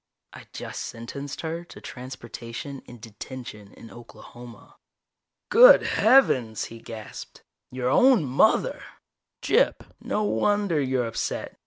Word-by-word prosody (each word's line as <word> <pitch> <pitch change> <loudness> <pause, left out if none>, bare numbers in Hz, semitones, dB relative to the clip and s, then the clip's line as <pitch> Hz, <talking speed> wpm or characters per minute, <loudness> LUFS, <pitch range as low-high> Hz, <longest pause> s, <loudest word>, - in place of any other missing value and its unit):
I - - -13
just - - -7
sentenced 140 +5 -7
her 165 +1 -4
to - - -13
transportation 125 +1 -8
and 120 -1 -12
detention 110 -1 -10
in 115 - -13
Oklahoma." 120 0 -14 0.7
"Good - - +8
heavens," 135 - +3
he 115 - -10
gasped. 110 -1 -10 0.3
"Your 125 0 -2
own 250 - +5
mother! 140 - +2 0.6
Gyp, - - +3 0.2
no 210 - -2
wonder 205 -6 +1
you're 130 -2 0
upset. 115 -1 -4
130 Hz, 115 wpm, -25 LUFS, 115-170 Hz, 0.7 s, Good